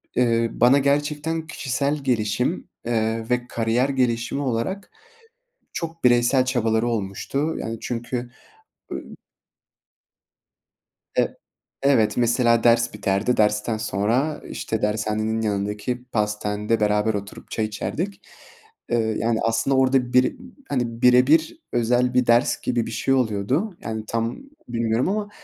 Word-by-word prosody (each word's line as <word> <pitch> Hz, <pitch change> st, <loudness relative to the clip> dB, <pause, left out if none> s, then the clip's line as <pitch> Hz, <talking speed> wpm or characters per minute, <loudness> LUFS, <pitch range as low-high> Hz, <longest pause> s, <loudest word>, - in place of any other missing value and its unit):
eee, 115 Hz, -2 st, +2 dB
bana 125 Hz, +4 st, +5 dB
gerçekten 150 Hz, +3 st, 0 dB
kişisel 140 Hz, +1 st, -1 dB
gelişim, 125 Hz, -, -1 dB, 0.2 s
eee, 115 Hz, -1 st, -1 dB
ve 125 Hz, 0 st, 0 dB
kariyer 115 Hz, +3 st, 0 dB
gelişimi 125 Hz, 0 st, 0 dB
olarak 140 Hz, -, -2 dB, 0.8 s
çok 165 Hz, -1 st, -6 dB
bireysel 120 Hz, +1 st, +4 dB
çabaları 115 Hz, -3 st, +1 dB
olmuştu. 120 Hz, +8 st, -2 dB
Yani, 115 Hz, 0 st, -4 dB
çünkü, 120 Hz, 0 st, -4 dB, 0.6 s
ı -, -, -2 dB, 2.2 s
E -, -, +1 dB, 0.5 s
evet. 135 Hz, -6 st, +3 dB
Mesela, 120 Hz, -1 st, +3 dB
ders 120 Hz, 0 st, +4 dB
biterdi. 100 Hz, +3 st, 0 dB
Dersten 105 Hz, +1 st, +2 dB
sonra, 110 Hz, +8 st, 0 dB
işte, -, -, -3 dB
dershanenin 110 Hz, +1 st, 0 dB
yanındaki 105 Hz, +4 st, -2 dB
pastanede 105 Hz, -1 st, -1 dB
beraber 105 Hz, +1 st, +2 dB
oturup 100 Hz, 0 st, -7 dB
çay 110 Hz, -, 0 dB
içerdik. 170 Hz, -, -4 dB, 0.7 s
Iıı, 110 Hz, -2 st, +1 dB
yani, 115 Hz, 0 st, 0 dB
aslında 115 Hz, +4 st, +1 dB
orada 130 Hz, -1 st, +2 dB
bir 125 Hz, 0 st, +3 dB, 0.3 s
hani, 120 Hz, -3 st, -2 dB
bire 125 Hz, 0 st, +6 dB
bir 160 Hz, -, +3 dB
özel 120 Hz, +1 st, +2 dB
bir 125 Hz, 0 st, +3 dB
ders 120 Hz, +1 st, +3 dB
gibi 120 Hz, -2 st, 0 dB
bir -, -, -6 dB
şey 115 Hz, +4 st, 0 dB
oluyordu. 130 Hz, -, 0 dB
Yani, 110 Hz, 0 st, -4 dB
tam 115 Hz, +1 st, -2 dB, 0.3 s
bilmiyorum 115 Hz, +5 st, 0 dB
ama, 205 Hz, 0 st, -2 dB
120 Hz, 120 wpm, -23 LUFS, 110-130 Hz, 2.2 s, bire